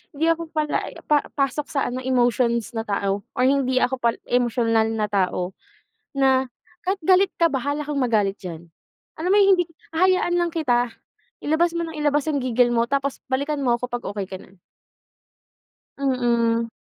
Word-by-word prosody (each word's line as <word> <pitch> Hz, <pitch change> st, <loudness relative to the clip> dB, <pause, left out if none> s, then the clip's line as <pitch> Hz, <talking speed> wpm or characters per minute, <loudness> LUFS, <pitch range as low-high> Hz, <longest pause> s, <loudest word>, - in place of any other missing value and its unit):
hindi 320 Hz, +3 st, 0 dB
ako 330 Hz, 0 st, -2 dB
pala 300 Hz, -1 st, 0 dB, 0.2 s
pa 295 Hz, -1 st, +2 dB
pasok 280 Hz, +1 st, -1 dB
sa 275 Hz, -, -1 dB
ano, 250 Hz, +1 st, -3 dB
emotions 240 Hz, -2 st, +1 dB
na 225 Hz, -1 st, -4 dB
tao 200 Hz, 0 st, -1 dB
or 250 Hz, -, +1 dB
hindi 260 Hz, -1 st, +2 dB
ako 260 Hz, 0 st, 0 dB
pa 235 Hz, -1 st, +1 dB
emosyonal 230 Hz, -2 st, +2 dB
na 210 Hz, -1 st, 0 dB
tao. 180 Hz, -2 st, 0 dB, 0.6 s
Na 265 Hz, -1 st, +3 dB, 0.4 s
kahit 385 Hz, 0 st, 0 dB
galit 375 Hz, +3 st, +4 dB
ka, 335 Hz, -1 st, +3 dB
bahala 285 Hz, +3 st, -1 dB
kang 295 Hz, -1 st, -3 dB
magalit 210 Hz, -5 st, +1 dB
diyan. 170 Hz, -3 st, -7 dB, 0.5 s
Alam 355 Hz, +4 st, -1 dB
mo -, -, +5 dB
yung 395 Hz, -, +5 dB
hindi 355 Hz, -, +2 dB, 0.3 s
hahayaan 365 Hz, +1 st, +2 dB
lang 345 Hz, -1 st, +1 dB
kita. 245 Hz, -7 st, +1 dB, 0.5 s
Ilabas 325 Hz, +3 st, +2 dB
mo 335 Hz, -, -1 dB
nang 320 Hz, -, -8 dB
ilabas 295 Hz, -1 st, +1 dB
yung 285 Hz, -3 st, 0 dB
gigil 245 Hz, -1 st, +2 dB
mo 230 Hz, -, +3 dB
tapos 275 Hz, 0 st, -1 dB
balikan 280 Hz, +2 st, -1 dB
mo 240 Hz, -2 st, +2 dB
ko 250 Hz, -, -2 dB
'pag 245 Hz, -1 st, -4 dB
okey 200 Hz, -2 st, -4 dB
ka 190 Hz, -, -7 dB
na. 190 Hz, -1 st, -19 dB, 1.4 s
Mm. 235 Hz, -3 st, +1 dB
255 Hz, 170 wpm, -23 LUFS, 235-300 Hz, 1.4 s, mo